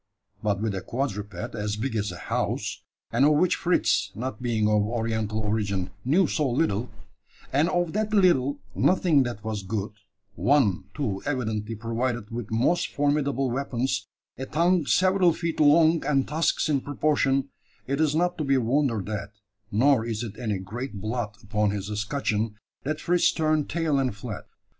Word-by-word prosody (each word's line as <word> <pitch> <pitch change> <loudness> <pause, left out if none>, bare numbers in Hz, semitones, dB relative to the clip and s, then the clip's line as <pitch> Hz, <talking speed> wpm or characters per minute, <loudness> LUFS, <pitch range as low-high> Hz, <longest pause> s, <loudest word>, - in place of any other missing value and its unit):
But 100 -2 0
with 110 -3 0
a 95 - -3
quadruped 110 -3 -4
as 105 -2 -2
big 115 +3 -3
as 105 -1 -1
a - - -8
house - - -2 0.3
and 120 +4 +2
of 150 +2 +6
which 170 +4 +3
Fritz, 175 +1 +1
not 125 0 -5
being 115 -3 +1
of 105 -1 +3
Oriental 110 -1 -1
origin, 100 -3 -1
knew 165 +9 +3
so 150 -3 0
little; 120 -3 0 0.6
and 150 +5 +3
of 175 -3 0
that 215 +1 -1
little 160 -9 +3 0.2
nothing 175 -5 +3
that 120 -5 -3
was 110 -2 -3
good 100 +1 -3 0.4
one, 105 - +2
too, 110 -10 -2
evidently 115 -5 -2
provided 115 0 -2
with 115 -2 -5
most 130 +11 +2
formidable 140 -3 0
weapons, 130 0 -1 0.3
a 130 - -4
tongue 170 -1 +2
several 185 -2 +4
feet 165 0 -3
long, 155 +2 +5
and 135 -3 +1
tusks 160 +3 +1
in 145 -3 +1
proportion 140 -1 +1 0.4
it 140 +3 -1
is 155 -1 +2
not 175 +1 +1
to - - 0
be 135 -1 +3
wondered 120 -4 +1
at, 105 -1 -4 0.4
nor 125 +3 +4
is 115 -1 -3
it 110 -3 -6
any 110 -5 -1
great 105 +4 -6
blot 110 0 -3
upon 105 0 +1
his 100 0 -3
escutcheon, 105 -1 -1 0.3
that 155 +2 -3
Fritz 175 +2 +3
turned 155 -2 0
tail 160 -4 +1
and 130 -6 0
fled. 110 0 -7
125 Hz, 165 wpm, -26 LUFS, 105-150 Hz, 0.6 s, of